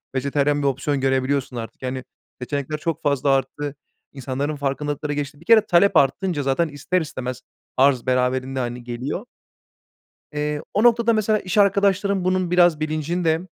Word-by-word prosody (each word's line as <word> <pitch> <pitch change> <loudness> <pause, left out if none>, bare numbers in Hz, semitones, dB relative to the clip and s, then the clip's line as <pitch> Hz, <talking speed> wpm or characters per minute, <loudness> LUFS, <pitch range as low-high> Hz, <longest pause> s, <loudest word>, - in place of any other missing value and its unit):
vejetaryen 140 +2 +1
bir 140 - +1
opsiyon 135 +1 -1
görebiliyorsun 130 0 0
artık. 115 -1 -7
Yani, 130 0 -4 0.4
seçenekler 140 +3 -3
çok 165 0 -3
fazla 140 -2 +1
arttı, 135 +2 -1 0.4
insanların 140 +2 -3
farkındalıkları 145 +1 -2
gelişti. 145 0 -4
Bir - - -18
kere 225 -1 +7
talep 190 -1 +4
artınca 150 +3 +1
zaten 135 +5 +1
ister 155 +5 -1
istemez 130 -4 -5 0.4
arz 130 -2 +3
beraberinde, 130 +1 0
hani, 120 0 -4
geliyor. 120 +4 -4 1.1
Eee, 150 0 -2
o 210 - +2
noktada, 235 -1 +4
mesela, 215 0 +2
iş 185 +1 -4
arkadaşlarım 200 -1 +3
bunun 185 -1 0
biraz 175 -3 +4
bilincinde. 160 +2 0
145 Hz, 145 wpm, -22 LUFS, 135-175 Hz, 1.1 s, kere